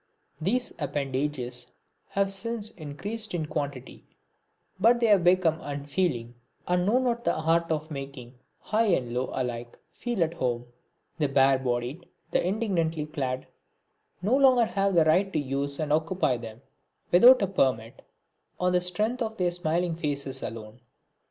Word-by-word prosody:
These 240 +9 0
appendages 135 -3 -3 0.4
have 195 0 0
since 220 +2 -2
increased 200 +8 -6
in 160 -3 -1
quantity, 140 -4 -5 0.8
but 235 +4 +5
they 235 - +2
have 205 -5 +5
become 175 -2 +3
unfeeling, 140 -4 -2 0.3
and 180 +1 +1
know 225 +4 +4
not 240 -2 0
the - - +1
art 165 +1 +1
of 155 0 -2
making 135 -3 -7 0.3
high 220 +1 +1
and 130 - +1
low 125 +1 -1
alike 120 -2 -4 0.2
feel 240 -7 -1
at 165 0 -2
home. 125 -7 -2 0.5
The 150 - +2
bare 135 -1 +4
bodied, 125 +6 -3 0.2
the - - +2
indigently 175 -6 0
clad, 135 -4 -3 0.8
no 220 +7 +3
longer 260 -4 +5
have 195 -3 0
the 165 -2 +5
right 190 +5 +3
to - - +1
use 140 0 -2
and 150 -2 0
occupy 160 -4 +1
them, 115 +1 -10 0.5
without 240 +6 +8
a - - +2
permit, 125 -11 0 0.6
on 180 0 +2
the 180 0 +3
strength 210 +8 -1
of 220 -1 -2
their 180 -1 +1
smiling 175 0 -1
faces 140 -4 -3
alone. 110 +1 -7
160 Hz, 150 wpm, -27 LUFS, 135-195 Hz, 0.8 s, without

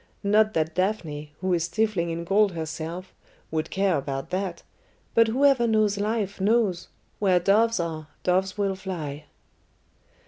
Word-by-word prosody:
Not 215 +2 +3
that 160 0 0
Daphne, 160 -6 -2
who 185 -1 +1
is 170 -1 +1
stifling 185 -2 0
in 165 0 -3
gold 200 +2 +3
herself, 165 +3 -5 0.4
would 160 0 -2
care 195 -3 +1
about 135 +3 -4
that, 185 -2 -3 0.5
but 230 0 +5
whoever 260 0 +3
knows 215 -2 +2
life 205 -2 -2
knows 205 -4 +2 0.3
where 185 -3 +3
doves 215 +4 +3
are, 160 -2 -3 0.2
doves 190 +2 +1
will 200 -1 +1
fly." 165 -7 -6
190 Hz, 140 wpm, -25 LUFS, 165-210 Hz, 0.5 s, but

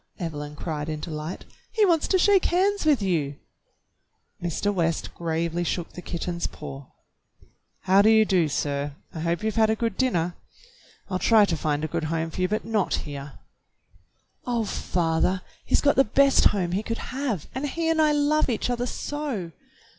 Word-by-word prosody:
Evelyn 150 -5 -5
cried 150 0 -4
in 155 -1 -3
delight, 155 +2 -6 0.3
"he 440 -2 +4
wants 335 -5 +2
to 380 - +3
shake 390 0 +4
hands 390 +2 +2
with 280 -9 +4
you! 155 -7 0 0.6
" - - -26
Mr. 175 +4 0
West 170 -3 -1
gravely 170 +1 -1
shook 175 0 -3
the 180 - -8
kitten's 170 0 -3
paw. 135 -1 -9 0.9
"How 190 +2 +5
do 215 - +5
you 220 -1 +6
do, 180 -6 +2
sir.^^ 140 0 -2 0.2
I - - -4
hope 170 +4 -1
you've 220 +1 -1
had 220 -1 +4
a 220 - +2
good 225 -3 -2
dinner. 175 -10 +1 0.8
I'll 185 - 0
try 215 +2 +5
to 175 - -1
find 150 -1 -1
a - - 0
good 165 0 -2
home 165 +1 -2
for 185 - -4
you, 185 - +3
but 215 +3 -2
not 220 -3 +1
here." 140 -1 -7 1.1
"Oh, 235 -2 0
father, 180 -1 0 0.2
he's - - +2
got 285 - +3
the 270 - +7
best 275 +4 +4
home 185 -4 +2
he 190 +3 0
could 230 +1 -4 0.2
have, 255 - -2
and 275 +3 -2
he 330 +3 -2
and 325 -1 +3
I 305 -1 +4
love 295 0 +2
each 240 +1 -1
other 245 0 -1
so 265 - -4
185 Hz, 185 wpm, -25 LUFS, 165-245 Hz, 1.1 s, the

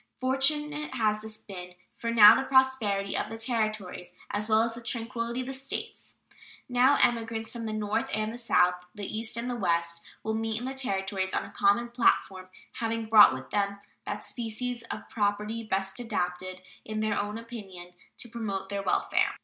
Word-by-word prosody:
Fortunate 295 +3 0
has 215 -2 +1
this 215 0 -7
been 180 -4 -10 0.2
for 230 - -3
the 230 +4 +8
prosperity 255 -7 +3
of - - -1
the 225 - -6
Territories, 215 -6 -2 0.2
as 210 +2 -2
well 220 +1 +5
as 230 0 -1
the 235 - -9
tranquillity 235 +1 -3
of - - -5
the 270 - -5
States. 270 +1 -6 0.5
Now 250 +2 +4
emigrants 225 -1 0
from 230 -2 -5
the - - -2
North 210 -1 -1
and 215 +1 -1
the - - -7
South, 180 -6 +3
the 205 -1 -5
East 225 +3 -4
and 235 +1 -3
the 245 - -2
West, 170 -5 0 0.2
will 220 - -1
meet 220 0 -1
in 245 - -4
the 265 - -3
Territories 195 -7 -1
on - - -1
a - - -11
common 205 +4 +2
platform, 190 -6 +1 0.2
having 230 0 -2
brought 215 -1 +8
with 130 0 -7
them 200 -1 0 0.3
that - - -4
species 240 +1 -4
of - - -6
property 210 +1 -1
best 195 -1 -2
adapted, 185 -5 -3 0.2
in 215 0 -3
their 215 -1 +1
own 205 +1 -3
opinion, 195 -7 -9 0.2
to - - -5
promote 205 -5 -4
their 200 -1 -2
welfare. - - +1
220 Hz, 180 wpm, -28 LUFS, 200-235 Hz, 0.5 s, the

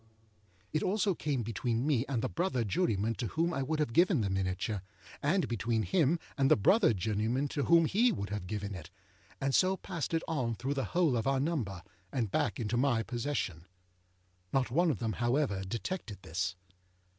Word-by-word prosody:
â - - -32 0.7
It 155 - +1
also 200 0 +1
came 145 -7 -2
between 115 +2 -1
me 140 -4 +1
and 120 -5 -1
the - - +1
brother 170 -9 0
juryman 110 - 0
to 120 - -2
whom 165 - 0
I 135 - -1
would 155 +4 -1
have 150 -6 -1
given 175 - +4
the 100 -2 -1
miniature, 95 +2 -1 0.4
and 175 +6 +2
between 115 -1 0
him 170 - +2 0.2
and 135 0 +4
the - - +7
brother 185 - +4
juryman 110 +6 0
to 140 - -1
whom 170 0 +6
he 230 +9 +3
would 100 - -4
have 105 -3 -4
given 105 -1 -4
it, 85 -5 -8 0.5
and 135 0 0
so 190 +4 +3
passed 170 -4 -3
it 165 - 0
on 125 -7 -1
through 135 +5 -2
the 135 -2 -1
whole 165 -8 +4
of 115 +2 0
our 135 -1 +2
number, 125 - -2 0.3
and 115 -7 -1
back - - 0
into 120 +1 -1
my 120 -3 +2
possession. 115 - -3 0.8
Not 130 -2 +1
one 170 +6 +3
of 140 - 0
them, 110 0 -2
however, 120 - 0
detected 105 - -5
this. 90 +2 -2
125 Hz, 190 wpm, -32 LUFS, 105-155 Hz, 0.8 s, the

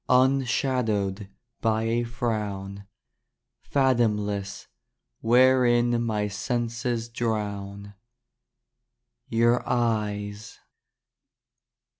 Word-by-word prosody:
Unshadowed 125 -6 +1 0.3
By 110 -1 +1
a 115 +1 0
frown, 105 -4 -4 0.7
Fathomless, 105 -7 0 0.5
Wherein 120 -1 +4
My 105 -2 -1
senses 120 +2 -2
Drown. 100 -3 -4 1.4
Your 120 +2 +3
Eyes. 105 -3 -1
115 Hz, 55 wpm, -26 LUFS, 105-120 Hz, 1.4 s, Wherein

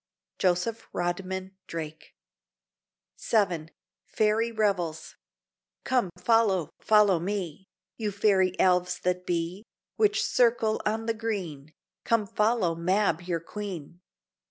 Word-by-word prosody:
Joseph 190 +5 0
Rodman 185 +2 -3
Drake 160 -1 -7 1.0
VII 180 -8 +1 0.4
FAIRY 220 +2 +1
REVELS 190 -8 -1 0.7
Come, 250 -7 +1
follow, 190 -5 +2
follow 210 -5 +4
me, 190 -1 -4 0.3
You 215 -2 -2
Fairy 195 -2 +2
Elves 180 -1 +3
that 180 0 -1
be, 175 +2 -1 0.4
Which 415 -2 +3
circle 230 -3 +2
on 220 +1 -1
the 230 - +1
green, 185 -10 -4 0.3
Come, 230 -2 +2
follow 210 -3 +1
Mab 180 +1 +1
your 175 -2 -2
Queen. 175 -3 -7
190 Hz, 105 wpm, -27 LUFS, 175-215 Hz, 1.0 s, follow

